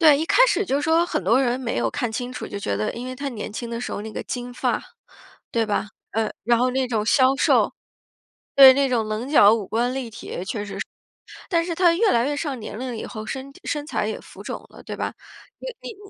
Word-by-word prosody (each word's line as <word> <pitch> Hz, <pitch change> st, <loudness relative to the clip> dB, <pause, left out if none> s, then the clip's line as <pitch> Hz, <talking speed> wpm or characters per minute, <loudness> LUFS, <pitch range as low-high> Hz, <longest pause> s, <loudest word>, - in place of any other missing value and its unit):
对， 305 Hz, -4 st, +7 dB
一 320 Hz, -, -1 dB
开 -, -, +6 dB
始 410 Hz, -, +1 dB
就 280 Hz, -3 st, +1 dB
说 325 Hz, +3 st, +3 dB
很 -, -, -2 dB
多 245 Hz, +3 st, +4 dB
人， 250 Hz, -1 st, 0 dB
没 245 Hz, -, -2 dB
有 120 Hz, 0 st, +1 dB
看 240 Hz, -, -2 dB
清 245 Hz, +3 st, -4 dB
楚， 250 Hz, -, -6 dB
就 200 Hz, -, -6 dB
觉 100 Hz, -, -2 dB
得 105 Hz, +1 st, -1 dB
因 245 Hz, +2 st, -6 dB
为 255 Hz, -, -5 dB
他 280 Hz, +2 st, -4 dB
年 220 Hz, -4 st, -6 dB
轻 235 Hz, +2 st, -5 dB
的 230 Hz, -, -4 dB
时 -, -, -4 dB
候 -, -, -4 dB
那 220 Hz, 0 st, -7 dB
个 -, -, -4 dB
金 245 Hz, 0 st, -5 dB
发， -, -, -1 dB, 0.7 s
对 230 Hz, -, +2 dB
吧？ 210 Hz, 0 st, -1 dB, 0.2 s
嗯， 220 Hz, -1 st, 0 dB
然 235 Hz, +2 st, +3 dB
后 250 Hz, +2 st, +2 dB
那 260 Hz, 0 st, 0 dB
种 220 Hz, -3 st, -1 dB
削 260 Hz, +2 st, +4 dB
瘦 -, -, +3 dB, 0.8 s
对， 270 Hz, -1 st, +11 dB
那 275 Hz, 0 st, +2 dB
种 230 Hz, -4 st, 0 dB
棱 215 Hz, +5 st, -3 dB
角 215 Hz, -8 st, +7 dB
五 220 Hz, -3 st, -1 dB
官 245 Hz, +3 st, 0 dB
立 255 Hz, -4 st, -4 dB
体 190 Hz, -4 st, -7 dB
确 205 Hz, +2 st, -4 dB
实 205 Hz, -, -7 dB
是， -, -, -3 dB, 0.6 s
但 335 Hz, -2 st, +2 dB
是 345 Hz, -, -2 dB
他 345 Hz, 0 st, +4 dB
越 415 Hz, +5 st, +3 dB
来 235 Hz, +2 st, +2 dB
越 290 Hz, 0 st, -1 dB
上 285 Hz, -5 st, -3 dB
年 215 Hz, -, -7 dB
龄 250 Hz, -2 st, -4 dB
以 -, -, -5 dB
后， 215 Hz, -2 st, -7 dB
身 265 Hz, +4 st, -6 dB
体 -, -, -17 dB
身 295 Hz, -1 st, -3 dB
材 -, -, -1 dB
也 -, -, -4 dB
浮 -, -, -13 dB
肿 -, -, -6 dB
了， -, -, -14 dB
对 -, -, -6 dB
吧？ -, -, -3 dB, 0.5 s
你 -, -, -8 dB
你 455 Hz, -, -7 dB
250 Hz, 270 characters per minute, -23 LUFS, 220-280 Hz, 0.8 s, 对